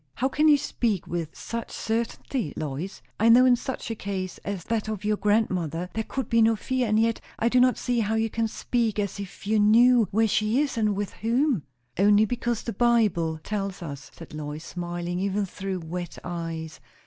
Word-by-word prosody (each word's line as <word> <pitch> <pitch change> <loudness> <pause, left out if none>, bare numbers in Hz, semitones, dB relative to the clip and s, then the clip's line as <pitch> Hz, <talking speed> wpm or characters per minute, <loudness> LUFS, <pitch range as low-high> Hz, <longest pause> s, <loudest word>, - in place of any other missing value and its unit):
"How 260 +4 0
can 300 +3 +2
you 295 -1 +7
speak 230 - -1
with 170 -3 -3
such 230 0 -5
certain'ty, 230 - -2
Lois? 155 +5 -5 0.2
I 225 +2 +5
know, 245 +2 +8
in 250 -1 +6
such 255 -1 -5
a - - -2
case 190 -3 -4
as 200 -4 -5
that 220 +1 -2
of 210 -2 -4
your 210 0 +2
grandmother, 185 -5 0
there 220 - -1
could 265 +1 -4
be 230 0 +3
no 225 0 +5
fear; 255 +2 -1
and 215 0 +3
yet 230 0 +1 0.2
I 230 - +2
do 250 - +3
not 250 0 +4
see 245 -1 0
how 220 0 0
you 225 0 +1
can 225 +1 -1
speak 225 -1 -1
as 200 -1 -2
if 195 0 -8
you 215 +1 +2
knew 230 +2 +6
where 225 +2 +2
she 215 +3 +1
is, 290 -2 0
and 215 -3 +1
with 205 0 -3
whom." 240 - +1 0.3
"Only 205 +2 +5
because 240 0 -2
the 230 - -4
Bible 195 -9 +2
tells 195 -3 -3
us," 140 -4 -7
said 165 - -11
Lois, 155 +1 -6
smiling 175 0 -4
even 200 +1 0
through 190 -1 -5
wet 175 +2 -6
eyes. 165 -2 -5
210 Hz, 200 wpm, -26 LUFS, 180-230 Hz, 0.3 s, know